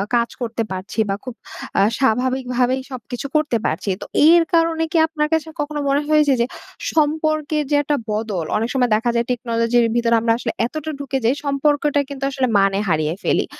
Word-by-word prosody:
কাজ 235 Hz, -1 st, +2 dB
করতে 230 Hz, -1 st, -2 dB
পারছি 190 Hz, +4 st, -5 dB
বা 195 Hz, -, +1 dB
খুব 255 Hz, -, -6 dB, 0.5 s
আ -, -, +5 dB, 0.2 s
স্বাভাবিকভাবেই 255 Hz, 0 st, +1 dB
সবকিছু 245 Hz, 0 st, -6 dB
করতে 300 Hz, -6 st, +2 dB
পারছি। -, -, -1 dB
তো -, -, -5 dB, 0.2 s
এর 340 Hz, 0 st, +6 dB
কারণে 330 Hz, -1 st, +2 dB
কি 335 Hz, -, +1 dB
আপনার 305 Hz, -1 st, -1 dB
কাছে 320 Hz, 0 st, +1 dB
কখনো 295 Hz, 0 st, -2 dB
মনে 280 Hz, +1 st, +2 dB
হয় 305 Hz, 0 st, +4 dB
যে, 275 Hz, -, +5 dB
যে, -, -, +3 dB, 0.5 s
সম্পর্কের 310 Hz, -1 st, +1 dB
যে -, -, +4 dB
একটা 290 Hz, +1 st, 0 dB, 0.2 s
বদল, 210 Hz, -6 st, -2 dB
অনেক 225 Hz, +2 st, -1 dB
সময় 250 Hz, -2 st, +2 dB
দেখা 235 Hz, +3 st, 0 dB
যায় 235 Hz, 0 st, +1 dB
টেকনোলজির 235 Hz, 0 st, +1 dB
ভিতরে 235 Hz, -1 st, +3 dB
আমরা 230 Hz, 0 st, +2 dB
আসলে 235 Hz, -2 st, -3 dB
এতটা 310 Hz, +5 st, -4 dB
ঢুকে 275 Hz, -1 st, -2 dB
যাই, 245 Hz, +5 st, +3 dB
সম্পর্কটা 290 Hz, +1 st, +1 dB
কিন্তু 275 Hz, -1 st, -7 dB
আসলে 260 Hz, -1 st, 0 dB
মানে 195 Hz, 0 st, +2 dB
হারিয়ে 155 Hz, 0 st, 0 dB
ফেলি। -, -, +1 dB
260 Hz, 185 wpm, -20 LUFS, 230-295 Hz, 0.5 s, এর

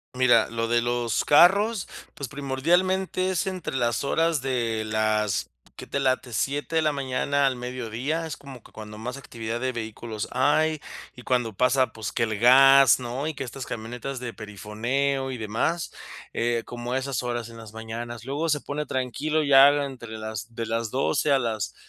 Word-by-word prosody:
Mira, 120 Hz, -3 st, +4 dB
lo 115 Hz, 0 st, -2 dB
de 120 Hz, 0 st, +2 dB
los 120 Hz, -2 st, 0 dB
carros, 195 Hz, +7 st, +5 dB, 0.3 s
pues, 140 Hz, -, -5 dB
primordialmente, 175 Hz, +8 st, 0 dB
es 185 Hz, -2 st, 0 dB
entre 185 Hz, -7 st, -4 dB
las 120 Hz, 0 st, 0 dB
horas 165 Hz, +1 st, +1 dB
de 120 Hz, -4 st, -1 dB
las, 110 Hz, -1 st, 0 dB, 0.2 s
¿qué -, -, -9 dB
te 140 Hz, -, -2 dB
late?, 130 Hz, -2 st, 0 dB
7 145 Hz, +8 st, -1 dB
de -, -, +4 dB
la 155 Hz, -, +2 dB
mañana 140 Hz, 0 st, 0 dB
al 135 Hz, -2 st, +2 dB
mediodía. 125 Hz, +5 st, -3 dB
Es 160 Hz, -4 st, -5 dB
como 135 Hz, -4 st, -12 dB
que -, -, -18 dB
cuando 105 Hz, -1 st, -9 dB
más 125 Hz, +4 st, -5 dB
actividad 115 Hz, -3 st, -5 dB
de 130 Hz, 0 st, -1 dB
vehículos 110 Hz, -1 st, -5 dB
hay, 150 Hz, +4 st, +2 dB, 0.3 s
y 125 Hz, -, -11 dB
cuando 120 Hz, -3 st, 0 dB
pasa, 130 Hz, +4 st, +2 dB
pues, 110 Hz, -3 st, -5 dB
que 120 Hz, -, 0 dB
el 110 Hz, -2 st, -2 dB
gas, 135 Hz, +1 st, +7 dB
¿no? 125 Hz, +5 st, -4 dB
Y 160 Hz, -, -3 dB
que 135 Hz, -, -4 dB
estas 130 Hz, +1 st, -7 dB
camionetas 120 Hz, +4 st, -5 dB
de 120 Hz, -2 st, -6 dB
perifoneo 115 Hz, +7 st, -2 dB
y 130 Hz, -, -4 dB
demás, 115 Hz, +10 st, -2 dB, 0.4 s
eh, 115 Hz, 0 st, 0 dB
como 120 Hz, +1 st, -5 dB
a -, -, +2 dB
esas 135 Hz, -2 st, -2 dB
horas 120 Hz, -1 st, -3 dB
en 115 Hz, -, -12 dB
las 110 Hz, -2 st, -11 dB
mañanas. 115 Hz, +1 st, -6 dB
Luego 145 Hz, +5 st, -2 dB
se 150 Hz, -1 st, +1 dB
pone 150 Hz, 0 st, -4 dB
tranquilo 145 Hz, +5 st, -1 dB
y 145 Hz, -, -2 dB
ya 135 Hz, +1 st, +9 dB
la 145 Hz, 0 st, +1 dB
entre 120 Hz, -5 st, -8 dB
las 110 Hz, +1 st, -6 dB
de 115 Hz, -, -3 dB
las 115 Hz, 0 st, -2 dB
12 135 Hz, +3 st, +1 dB
a 135 Hz, -, +5 dB
las 115 Hz, -4 st, -2 dB
125 Hz, 190 wpm, -25 LUFS, 115-140 Hz, 0.4 s, ya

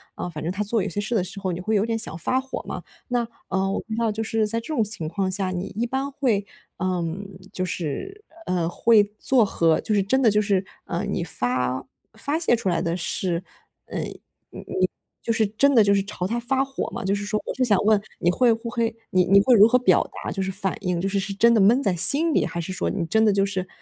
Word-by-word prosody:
啊， -, -, -4 dB
反 155 Hz, -2 st, -7 dB
正 170 Hz, -, -1 dB
他 200 Hz, +2 st, -2 dB
做 210 Hz, -1 st, 0 dB
一 205 Hz, -, -2 dB
些 205 Hz, -, -4 dB
事 215 Hz, +4 st, -3 dB
的 185 Hz, -, +2 dB
时 195 Hz, -, -8 dB
候， 190 Hz, -2 st, -2 dB
你 170 Hz, -, -4 dB
会 215 Hz, +3 st, 0 dB
有 205 Hz, +1 st, +2 dB
点 225 Hz, 0 st, -1 dB
想 220 Hz, -7 st, -3 dB
发 255 Hz, +10 st, 0 dB
火 265 Hz, 0 st, -6 dB
嘛。 -, -, -5 dB, 0.3 s
那， 240 Hz, -2 st, 0 dB, 0.2 s
呃， 190 Hz, 0 st, 0 dB
我 -, -, -1 dB
不 -, -, -10 dB
知 -, -, -3 dB
道 230 Hz, -2 st, +1 dB
就 220 Hz, +1 st, -3 dB
是 220 Hz, 0 st, 0 dB
在 230 Hz, +2 st, 0 dB
这 230 Hz, -, -11 dB
种 230 Hz, -6 st, +2 dB
情 200 Hz, -7 st, -4 dB
况 190 Hz, +3 st, -1 dB
下， 190 Hz, -1 st, -1 dB
你 180 Hz, +2 st, -3 dB
一 235 Hz, -, +1 dB
般 270 Hz, +3 st, -2 dB
会， 235 Hz, -8 st, 0 dB, 0.3 s
嗯， 180 Hz, +1 st, -2 dB, 0.3 s
就 185 Hz, -, -2 dB
是， 190 Hz, -, -5 dB, 0.2 s
呃， 175 Hz, -2 st, 0 dB
会 215 Hz, +4 st, +4 dB, 0.2 s
做 250 Hz, -5 st, +4 dB
和 165 Hz, -4 st, +2 dB
就 215 Hz, -, -1 dB
是 200 Hz, -, +3 dB
真 260 Hz, +7 st, +1 dB
的 230 Hz, -, +5 dB
就 210 Hz, -, +3 dB
是 200 Hz, -2 st, 0 dB, 0.2 s
啊， 175 Hz, +3 st, -3 dB
你 200 Hz, -4 st, -2 dB
发 125 Hz, -3 st, -2 dB, 0.3 s
发 295 Hz, +3 st, -2 dB
泄 275 Hz, -8 st, +3 dB
出 220 Hz, -, -4 dB
来 175 Hz, -, 0 dB
的 170 Hz, +1 st, -1 dB
是， 175 Hz, 0 st, -1 dB, 0.4 s
嗯， -, -, -4 dB
你 -, -, -8 dB, 0.6 s
你 -, -, +2 dB, 0.3 s
就 230 Hz, -, -2 dB
是 220 Hz, -1 st, +2 dB
真 275 Hz, +7 st, +2 dB
的 225 Hz, -, +7 dB
就 200 Hz, 0 st, +3 dB
是 195 Hz, -, +2 dB
朝 195 Hz, -2 st, -5 dB
他 235 Hz, +3 st, -1 dB
发 265 Hz, +3 st, 0 dB
火 270 Hz, -, -4 dB
吗？ 235 Hz, -, -5 dB
就 195 Hz, -, +1 dB
是 205 Hz, -, -4 dB
说 210 Hz, +1 st, -1 dB
我 -, -, -3 dB
就 260 Hz, -, 0 dB
想 210 Hz, -6 st, +4 dB
问 215 Hz, -2 st, +4 dB, 0.2 s
你 175 Hz, -, +2 dB
会 240 Hz, +3 st, +4 dB
不 225 Hz, +1 st, -5 dB
会 230 Hz, -1 st, -1 dB, 0.2 s
你 185 Hz, -1 st, +3 dB
你 195 Hz, +2 st, +6 dB
会 245 Hz, +3 st, +5 dB
如 210 Hz, +1 st, +8 dB
何 250 Hz, -, +4 dB
表 190 Hz, -8 st, +4 dB, 0.2 s
达？ -, -, -3 dB
就 195 Hz, -, -3 dB
是 190 Hz, -, -2 dB
反 195 Hz, 0 st, -2 dB
应， 180 Hz, -3 st, -1 dB
就 195 Hz, -, -1 dB
是 200 Hz, -, 0 dB
是 195 Hz, +1 st, -3 dB
真 235 Hz, +4 st, +4 dB
的 220 Hz, -, +4 dB
闷 235 Hz, +7 st, +5 dB
在 185 Hz, -, +1 dB
心 285 Hz, -, +5 dB
里， -, -, +2 dB
还 170 Hz, -, -4 dB
是 185 Hz, +3 st, -4 dB
说 -, -, -1 dB
你 170 Hz, -, -2 dB
真 220 Hz, +6 st, +2 dB
的 215 Hz, -, +5 dB
就 195 Hz, 0 st, +2 dB
是， 190 Hz, -2 st, -3 dB
205 Hz, 280 characters per minute, -24 LUFS, 185-230 Hz, 0.6 s, 如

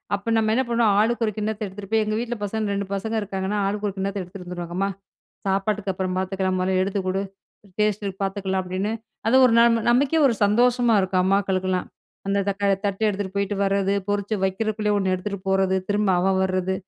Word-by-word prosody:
அப்ப 200 Hz, +3 st, -4 dB
நம்ம 220 Hz, -1 st, +2 dB
என்ன 260 Hz, +3 st, +2 dB
பண்ணுவோம்? 230 Hz, -3 st, +3 dB
ஆளுக்கொரு 225 Hz, 0 st, +1 dB
கிண்ணத்த 215 Hz, 0 st, -2 dB
எடுத்துட்டு 195 Hz, 0 st, -9 dB
போயி, 220 Hz, -1 st, +3 dB
எங்க 215 Hz, 0 st, -1 dB
வீட்ல 240 Hz, 0 st, -3 dB
பசங்க 210 Hz, 0 st, -2 dB
2 200 Hz, 0 st, -2 dB
பசங்க 220 Hz, +3 st, -3 dB
இருக்காங்கன்னா, 195 Hz, 0 st, -3 dB
ஆளுக்கு 205 Hz, +1 st, -2 dB
ஒரு 195 Hz, -, -8 dB
கிண்ணத்த 195 Hz, +1 st, -2 dB
எடுத்துட்டு 180 Hz, +1 st, -9 dB
வந்துருவாங்க. 175 Hz, -1 st, -6 dB
"அம்மா, 195 Hz, +1 st, +1 dB, 0.6 s
சாப்பாட்டுக்கு 195 Hz, +1 st, 0 dB
அப்புறம் 185 Hz, 0 st, -2 dB
பாத்துக்கலாம். 190 Hz, 0 st, -1 dB
மொதல்ல 185 Hz, 0 st, +1 dB
எடுத்து 195 Hz, 0 st, -2 dB
குடு, 190 Hz, +1 st, 0 dB, 0.6 s
டேஸ்ட்டு 210 Hz, -1 st, 0 dB
பாத்துக்கலாம்” 190 Hz, -1 st, -1 dB
அப்படின்னு 185 Hz, +4 st, -2 dB, 0.4 s
அது 245 Hz, -, +4 dB
ஒரு 250 Hz, -, +5 dB
நம் 235 Hz, 0 st, +5 dB
நமக்கே 275 Hz, +6 st, +3 dB
ஒரு 245 Hz, -, +2 dB
சந்தோஷமா 240 Hz, +2 st, +3 dB
இருக்கும். 185 Hz, -1 st, +1 dB
அம்மாக்களுக்கெல்லாம் 190 Hz, -1 st, 0 dB, 0.4 s
அந்த 200 Hz, 0 st, +1 dB
தக்கா 200 Hz, 0 st, -1 dB, 0.2 s
தட்டு 200 Hz, +1 st, -3 dB
எடுத்துட்டு 200 Hz, -2 st, -3 dB
போய்ட்டு 200 Hz, 0 st, -1 dB
வரது, 195 Hz, 0 st, +1 dB
பொறிச்சு 205 Hz, +1 st, -1 dB
வைக்கிறதுக்குள்ளயே 210 Hz, +2 st, 0 dB
ஒண்ணு 190 Hz, -1 st, 0 dB
எடுத்துட்டு 200 Hz, +2 st, -4 dB
போறது, 190 Hz, 0 st, +2 dB
திரும்ப 205 Hz, 0 st, +1 dB
அவன் 190 Hz, +1 st, +2 dB
வர்ரது. 185 Hz, 0 st, 0 dB
200 Hz, 180 wpm, -23 LUFS, 190-215 Hz, 0.6 s, ஒரு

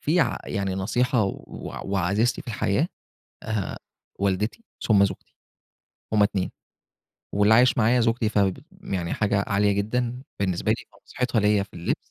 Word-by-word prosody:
في 165 Hz, +4 st, +2 dB
ع -, -, +1 dB
يعني 100 Hz, -1 st, -2 dB
نصيحة 120 Hz, +5 st, +1 dB, 0.6 s
وعزيزتي 100 Hz, +5 st, +1 dB
في -, -, -12 dB
الحياة 115 Hz, -, 0 dB, 0.5 s
آآ، 110 Hz, -4 st, -3 dB, 0.4 s
والدتي 100 Hz, -, -1 dB, 0.2 s
ثم 100 Hz, -3 st, +5 dB
زوجتي. 100 Hz, -, -5 dB, 0.8 s
هم 105 Hz, -1 st, +4 dB
اتنين، 100 Hz, -2 st, +1 dB, 0.8 s
واللي 105 Hz, +2 st, +5 dB
عايش 125 Hz, +1 st, +5 dB
معايا 120 Hz, +3 st, +4 dB
زوجتي 115 Hz, -1 st, +2 dB
ف -, -, -8 dB, 0.5 s
يعني 85 Hz, -3 st, -2 dB
حاجة 100 Hz, -1 st, +1 dB
عالية 100 Hz, 0 st, +2 dB
جدًا، 120 Hz, +5 st, -1 dB, 0.2 s
بالنسبة 95 Hz, -3 st, 0 dB
لي -, -, 0 dB, 0.2 s
فنصيحتها 125 Hz, -3 st, -1 dB
ليّا 105 Hz, -1 st, +3 dB
في 100 Hz, -, -12 dB
اللبس. 85 Hz, -, -1 dB
105 Hz, 140 wpm, -25 LUFS, 100-120 Hz, 0.8 s, ثم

